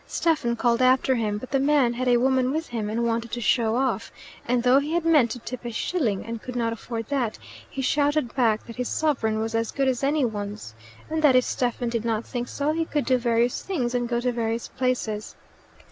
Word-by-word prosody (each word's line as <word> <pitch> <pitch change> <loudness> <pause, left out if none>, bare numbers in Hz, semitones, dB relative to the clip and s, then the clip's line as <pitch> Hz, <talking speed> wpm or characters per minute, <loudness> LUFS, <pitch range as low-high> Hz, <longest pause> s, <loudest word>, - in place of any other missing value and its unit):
Stephen 295 -8 +1
called 235 +1 +1
after 255 +1 +4
him; 215 -4 -1
but 250 +4 -9
the 275 - +2
man 275 -3 +3
had 255 +1 -2
a 245 -1 +5
woman 260 +1 +2
with 315 +3 -3
him 220 -3 -3
and 230 +2 -1
wanted 230 0 -1
to 245 - -4
show 230 -1 +2
off, 250 -3 -1 0.4
and 245 0 +1
though 255 +2 +5
he 295 +3 -3
had 340 -1 0
meant 300 -8 +5
to 235 - -4
tip 250 +1 -7
a 240 - -4
shilling, 230 - -1
and 230 0 -5
could 250 - -7
not 230 -1 0
afford 230 0 -6
that, 255 -6 -1 0.3
he 270 - -4
shouted 290 -2 +1
back 225 -5 +1
that 230 - -10
his 250 -1 -2
sovereign 230 -9 0
was 225 +1 -2
as 225 0 0
good 275 -1 0
as 260 0 0
any 285 0 +2
one's, 205 - -5 0.3
and 315 0 -2
that 290 -4 +5
if 255 - +5
Stephen 245 -1 -1
did 230 -2 -2
not 225 -1 -1
think 245 -1 -4
so 290 +4 -1
he 325 +1 0
could 300 -3 -2
do 255 - +3
various 235 0 +1
things 255 -11 -2
and 245 -1 -1
go 235 -1 +1
to 250 +1 0
various 230 -1 -2
places. 235 -5 -2
245 Hz, 230 wpm, -25 LUFS, 230-270 Hz, 0.4 s, a